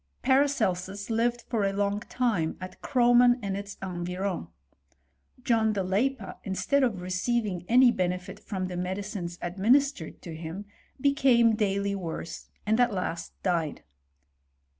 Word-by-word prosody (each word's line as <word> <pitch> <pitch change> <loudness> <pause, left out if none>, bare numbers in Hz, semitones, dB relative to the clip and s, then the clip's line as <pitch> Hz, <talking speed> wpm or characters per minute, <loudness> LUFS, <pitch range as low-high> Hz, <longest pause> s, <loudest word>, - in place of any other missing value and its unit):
Paracelsus 215 -8 +1
lived 235 +1 +1
for 225 -4 -1
a 195 - +2
long 200 +1 0
time 210 -8 -1
at 185 0 -9
Kroman, 245 -1 +5
^U^ 200 -4 -3
its. 200 0 -6
environs. 180 - -3 1.0
John 220 -2 +2
de 200 - 0
Leippa, 225 +9 -1
instead 220 +8 +1
of 250 -4 +2
receiv 185 +6 -1
ing 180 -4 -4
any 250 +1 +7
benefit 180 -3 -2
from 190 -3 -4
the 180 -1 -5
medicines 185 -1 -4
administered 210 - +1
to 165 -2 -7
hlfti, 165 +5 -6 0.3
became 255 -5 +4
daily 200 -2 0
worse, 170 -3 -5 0.2
and 220 +3 +2
at 245 -1 +4
last 180 -3 -3
died. 165 -5 -1
200 Hz, 135 wpm, -28 LUFS, 185-240 Hz, 1.0 s, any